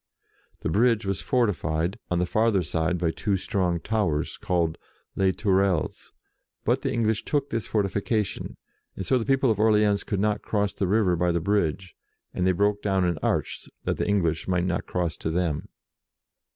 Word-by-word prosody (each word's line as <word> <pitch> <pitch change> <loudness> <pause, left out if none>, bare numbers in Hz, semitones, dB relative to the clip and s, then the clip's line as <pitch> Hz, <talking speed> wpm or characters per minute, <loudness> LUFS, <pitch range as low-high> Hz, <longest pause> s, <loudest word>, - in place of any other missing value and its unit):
The - - -1
bridge 115 +2 +3
was 95 -1 -2
fortified, 90 -7 0
on 90 - +1
the 90 - +2
farther 110 0 +2
side, 80 +2 0
by 85 -1 0
two 100 +3 -1
strong 90 -4 0
towers, 85 -8 -1
called 85 -3 0 0.4
Les 95 -1 +3
Tourelles, 95 -4 0 0.5
but - - +2
the - - -1
English 110 -1 0
took 145 -1 -1
this 115 -1 -2
fortification, 105 0 -1 0.4
and 95 - -5
so 130 - +2
the 115 - -4
people 135 -2 +3
of 105 - -1
Orleans 105 -2 +3
could 100 - -2
not 105 +1 +1
cross 105 -2 -1
the 95 - -1
river 100 -2 +3
by 90 +1 +1
the 85 - +1
bridge, 95 -2 0 0.4
and 90 - 0
they - - +5
broke 100 +2 +1
down 95 -2 +1
an 85 -3 0
arch, - - -1
that - - -1
the - - -1
English 85 -6 +1
might 90 -1 +1
not 90 -1 -2
cross 85 -2 -1
to - - -3
them. 80 -3 -1
95 Hz, 180 wpm, -26 LUFS, 85-105 Hz, 0.5 s, they